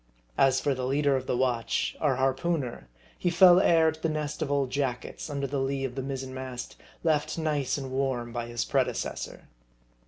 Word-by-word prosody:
As 135 Hz, -1 st, +5 dB
for 145 Hz, -, +1 dB
the 130 Hz, -1 st, -3 dB
leader 140 Hz, +1 st, +2 dB
of 130 Hz, -1 st, -3 dB
the 125 Hz, -, 0 dB
watch 120 Hz, -3 st, 0 dB
our 145 Hz, -4 st, +2 dB
harpooneer 135 Hz, -, -1 dB, 0.3 s
he 180 Hz, -, +1 dB
fell 175 Hz, +1 st, +7 dB
heir 165 Hz, -3 st, +5 dB
to 160 Hz, 0 st, -13 dB
the 165 Hz, -, +1 dB
nest 150 Hz, -1 st, -3 dB
of 145 Hz, -, -1 dB
old 140 Hz, -3 st, +1 dB
jackets, 130 Hz, +1 st, -3 dB
under 140 Hz, -1 st, -2 dB
the 140 Hz, +1 st, -2 dB
lee 135 Hz, 0 st, -1 dB
of 130 Hz, -, -4 dB
the 135 Hz, -, -3 dB
mizzen 130 Hz, -1 st, -5 dB
mast, 130 Hz, -1 st, -6 dB, 0.3 s
left 155 Hz, -2 st, +1 dB
nice 150 Hz, -5 st, 0 dB
and 135 Hz, -2 st, -5 dB
warm 130 Hz, -3 st, -1 dB
by 120 Hz, 0 st, -3 dB
his 120 Hz, 0 st, -2 dB
pre -, -, +3 dB
decessor. -, -, -5 dB
135 Hz, 195 wpm, -28 LUFS, 130-150 Hz, 0.3 s, fell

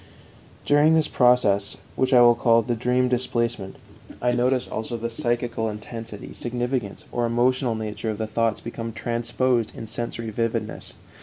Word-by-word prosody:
During 150 Hz, +2 st, +5 dB
this 160 Hz, -1 st, +3 dB
process, 115 Hz, -6 st, +3 dB, 0.2 s
which 130 Hz, 0 st, +1 dB
I 125 Hz, -2 st, +7 dB
will 120 Hz, 0 st, +8 dB
call 115 Hz, -1 st, +3 dB
the 120 Hz, -, -1 dB
dream 125 Hz, +2 st, +1 dB
displacement, 120 Hz, -5 st, -1 dB, 0.4 s
I 125 Hz, -, +1 dB
notice 125 Hz, +1 st, +1 dB
also 110 Hz, +2 st, -4 dB
the 115 Hz, +1 st, -4 dB
psychical 120 Hz, -1 st, -1 dB
intensity, 110 Hz, 0 st, -8 dB
significance, 120 Hz, -3 st, -3 dB
or 120 Hz, -1 st, 0 dB
emotional 120 Hz, +1 st, +1 dB
nature 110 Hz, 0 st, -4 dB
of 110 Hz, -, -2 dB
the 110 Hz, -, -2 dB
thoughts 115 Hz, 0 st, 0 dB
become 115 Hz, -1 st, -6 dB
transposed 120 Hz, 0 st, -1 dB
in -, -, -6 dB
sensory 115 Hz, 0 st, -4 dB
vividness. 115 Hz, 0 st, -3 dB
120 Hz, 150 wpm, -24 LUFS, 110-125 Hz, 0.4 s, will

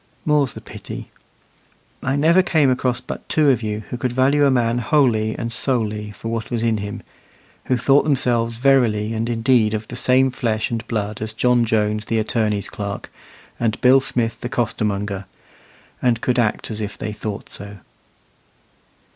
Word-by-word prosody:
More's 150 Hz, -4 st, +2 dB
the -, -, -9 dB
pity. -, -, -9 dB, 0.9 s
I 135 Hz, +1 st, 0 dB
never 165 Hz, +6 st, +5 dB
came 155 Hz, -7 st, +3 dB
across 125 Hz, -1 st, 0 dB
but -, -, -8 dB
two 150 Hz, -3 st, +4 dB
of 125 Hz, -, 0 dB
you 105 Hz, -1 st, -3 dB
who 125 Hz, -, -3 dB
could 125 Hz, 0 st, -1 dB
value 140 Hz, +3 st, +3 dB
a -, -, +4 dB
man 120 Hz, -2 st, +2 dB
wholly 115 Hz, -4 st, +2 dB
and 115 Hz, -, -3 dB
solely 110 Hz, -4 st, -1 dB
for 110 Hz, +2 st, -7 dB
what 115 Hz, -1 st, -3 dB
was 115 Hz, -1 st, -2 dB
in 115 Hz, -2 st, +2 dB
him 105 Hz, 0 st, -6 dB, 0.6 s
who 130 Hz, -, +1 dB
thought 135 Hz, +4 st, +4 dB
themselves 120 Hz, -5 st, +1 dB
verily 115 Hz, -5 st, +2 dB
and 115 Hz, +1 st, -2 dB
indeed 115 Hz, -2 st, +2 dB
of 110 Hz, 0 st, -5 dB
the -, -, -6 dB
same 130 Hz, +1 st, +3 dB
flesh 110 Hz, -3 st, -1 dB
and 115 Hz, -1 st, -3 dB
blood 105 Hz, -2 st, -3 dB
as 110 Hz, 0 st, -4 dB
John 120 Hz, +1 st, +3 dB
Jones 105 Hz, -1 st, 0 dB
the 115 Hz, -, -1 dB
attorney's 110 Hz, -2 st, 0 dB
clerk, 100 Hz, -1 st, -6 dB, 0.5 s
and 110 Hz, -2 st, 0 dB
Bill 130 Hz, +2 st, +6 dB
Smith 120 Hz, -3 st, -2 dB
the 120 Hz, -, -4 dB
costermonger, 100 Hz, -4 st, -2 dB, 0.8 s
and 120 Hz, -2 st, +2 dB
could 125 Hz, +1 st, 0 dB
act 115 Hz, 0 st, 0 dB
as 110 Hz, 0 st, -4 dB
if 105 Hz, -1 st, -5 dB
they 105 Hz, -, -4 dB
thought 105 Hz, -1 st, -5 dB
so. 100 Hz, +1 st, -8 dB
115 Hz, 170 wpm, -21 LUFS, 110-130 Hz, 0.9 s, Bill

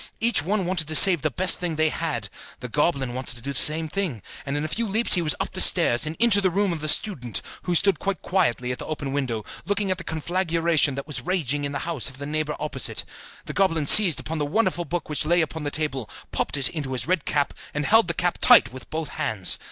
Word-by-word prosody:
Each 225 Hz, -7 st, +3 dB
one 190 Hz, +4 st, -2 dB
wanted 175 Hz, -4 st, 0 dB
to 155 Hz, -, -2 dB
save 175 Hz, -1 st, +8 dB
the -, -, -1 dB
best 185 Hz, 0 st, +4 dB
thing 175 Hz, -3 st, -3 dB
they 155 Hz, 0 st, +1 dB
had; 150 Hz, -11 st, -4 dB, 0.3 s
the 125 Hz, -, -7 dB
goblin 135 Hz, -1 st, -1 dB
wanted 130 Hz, 0 st, -6 dB
to 120 Hz, -, -8 dB
do 140 Hz, +1 st, -5 dB
the -, -, +4 dB
same 160 Hz, +1 st, +2 dB
thing, 155 Hz, -, -4 dB, 0.2 s
and 140 Hz, +1 st, -3 dB
in 145 Hz, -, -3 dB
a -, -, -2 dB
few 225 Hz, +9 st, -3 dB
leaps 220 Hz, +4 st, +2 dB
he 175 Hz, -, +4 dB
was 155 Hz, -2 st, +2 dB
up -, -, -4 dB
the -, -, +3 dB
stairs, 120 Hz, +6 st, +4 dB
and 155 Hz, -, -5 dB
into 225 Hz, -3 st, +3 dB
the 190 Hz, -, +1 dB
room 195 Hz, +1 st, -1 dB
of 165 Hz, -, -6 dB
the 155 Hz, -, -4 dB
student, 135 Hz, -, +2 dB, 0.3 s
who 180 Hz, -, -1 dB
stood 195 Hz, 0 st, +2 dB
quite 195 Hz, -4 st, -4 dB
quietly 125 Hz, -9 st, -1 dB
at 125 Hz, -, -6 dB
the -, -, -7 dB
open 145 Hz, -3 st, -5 dB
window, 125 Hz, -7 st, -3 dB, 0.2 s
looking 200 Hz, +1 st, -2 dB
at 185 Hz, -, -2 dB
the -, -, -7 dB
conflagration 165 Hz, -3 st, -1 dB
that 140 Hz, 0 st, -6 dB
was 145 Hz, -4 st, -4 dB
raging 145 Hz, -3 st, -2 dB
in 140 Hz, -, -4 dB
the 140 Hz, -, -4 dB
house 165 Hz, -6 st, -1 dB
of 130 Hz, -, -14 dB
the 140 Hz, -, -8 dB
neighbour 150 Hz, 0 st, -3 dB
opposite. 150 Hz, -4 st, -1 dB, 0.4 s
The -, -, -7 dB
goblin 165 Hz, -6 st, 0 dB
seized 175 Hz, -2 st, +7 dB
upon 160 Hz, 0 st, -6 dB
the -, -, -1 dB
wonderful 185 Hz, -1 st, -1 dB
book 175 Hz, 0 st, -5 dB
which 150 Hz, -, -2 dB
lay 170 Hz, +3 st, +1 dB
upon 160 Hz, -1 st, -5 dB
the -, -, -2 dB
table, 145 Hz, -5 st, -4 dB, 0.2 s
popped -, -, -2 dB
it 135 Hz, -2 st, +3 dB
into 145 Hz, -5 st, -6 dB
his 130 Hz, -, -3 dB
red 180 Hz, -3 st, -1 dB
cap, 145 Hz, -1 st, -1 dB, 0.2 s
and 150 Hz, 0 st, -4 dB
held 220 Hz, +2 st, +3 dB
the 170 Hz, -, -3 dB
cap 175 Hz, -1 st, -2 dB
tight 125 Hz, -, +6 dB
with 130 Hz, -, -12 dB
both 160 Hz, -1 st, -5 dB
hands. 110 Hz, -, 0 dB
155 Hz, 255 wpm, -23 LUFS, 140-180 Hz, 0.4 s, save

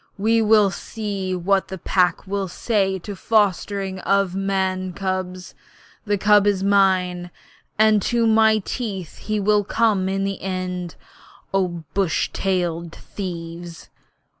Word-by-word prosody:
We 225 Hz, +3 st, +2 dB
will 210 Hz, -2 st, +4 dB
see 200 Hz, -4 st, -4 dB
what 190 Hz, +2 st, +1 dB
the 190 Hz, -, -6 dB
Pack 180 Hz, 0 st, +1 dB
will 195 Hz, 0 st, -2 dB
say 195 Hz, 0 st, 0 dB
to 190 Hz, +3 st, -8 dB
this 195 Hz, -, -8 dB
fostering 200 Hz, -2 st, 0 dB
of 195 Hz, -1 st, +1 dB
man 190 Hz, -1 st, -1 dB
cubs. 185 Hz, -1 st, -4 dB, 0.5 s
The 205 Hz, -1 st, +1 dB
cub 205 Hz, +1 st, +4 dB
is 195 Hz, -2 st, +1 dB
mine, 185 Hz, -3 st, +2 dB, 0.5 s
and 215 Hz, -1 st, +4 dB
to 235 Hz, +3 st, +1 dB
my 220 Hz, -1 st, +4 dB
teeth 195 Hz, -, -5 dB
he 215 Hz, -1 st, -2 dB
will 205 Hz, +1 st, +3 dB
come 205 Hz, -3 st, +1 dB
in 195 Hz, 0 st, -1 dB
the 195 Hz, 0 st, -3 dB
end, 180 Hz, -2 st, -4 dB, 0.6 s
O 180 Hz, -4 st, -1 dB
bush 195 Hz, -5 st, 0 dB
tailed 170 Hz, -3 st, -1 dB
thieves!' 170 Hz, -3 st, -7 dB
195 Hz, 135 wpm, -22 LUFS, 185-205 Hz, 0.6 s, will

